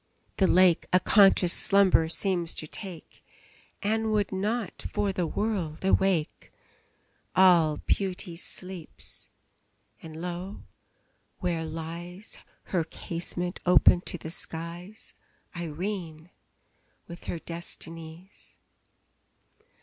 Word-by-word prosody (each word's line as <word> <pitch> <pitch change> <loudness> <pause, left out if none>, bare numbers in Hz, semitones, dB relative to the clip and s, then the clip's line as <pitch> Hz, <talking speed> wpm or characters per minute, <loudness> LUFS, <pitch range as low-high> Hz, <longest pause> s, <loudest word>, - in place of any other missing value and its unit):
the 190 - +4
lake 180 -2 +5
A 185 - +6
conscious 195 -2 +5
slumber 190 -5 +4
seems 175 -2 0
to - - -3
take, 175 0 -8 0.6
And 220 +1 +1
would 210 -2 +1
not, 210 +3 -2
for 200 -2 0
the 180 -3 -1
world, 190 -5 -2
awake. 190 -4 +1 0.8
All 170 -5 +6
Beauty 185 -2 -1
sleeps! 180 -1 -6 0.7
and 160 -1 -9
lo! 180 +3 -5 0.7
where 170 -3 -1
lies 170 +4 -7 0.2
(Her 175 -3 0
casement 175 +2 -4
open 180 0 +6
to 180 - -2
the 160 0 -7
skies) 170 +5 -6 0.4
Irene, 170 0 -5 0.8
with 170 0 -10
her - - -3
Destinies! 165 +1 -6
180 Hz, 95 wpm, -28 LUFS, 165-195 Hz, 0.8 s, A